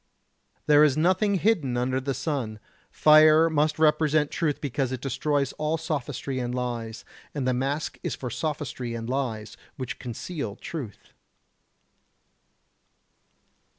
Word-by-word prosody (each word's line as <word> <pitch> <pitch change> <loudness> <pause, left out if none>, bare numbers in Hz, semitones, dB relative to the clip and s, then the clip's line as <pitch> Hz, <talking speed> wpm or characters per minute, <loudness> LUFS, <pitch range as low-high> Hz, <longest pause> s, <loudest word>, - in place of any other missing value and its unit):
There 150 0 +6
is 150 -2 +3
nothing 185 +5 +2
hidden 170 - +1
under 130 +2 0
the 135 0 -2
sun. 130 -5 -3 0.3
Fire 155 +1 +6
must 150 0 +1
represent 155 -1 +3
truth 155 -5 -1
because 135 -2 -2
it 130 - -3
destroys 140 +1 -1
all 155 +2 0
sophistry 145 -4 -3
and 125 0 -3
lies, 120 -3 -4 0.3
and 135 -3 -1
the 130 - +2
mask 135 +4 -2
is - - -3
for 125 -2 -6
sophistry 140 -5 -3
and 115 0 -5
lies, 120 -5 -3 0.2
which 130 -3 -5
conceal 125 - -5
truth. 135 -11 -8
140 Hz, 125 wpm, -26 LUFS, 125-155 Hz, 0.3 s, There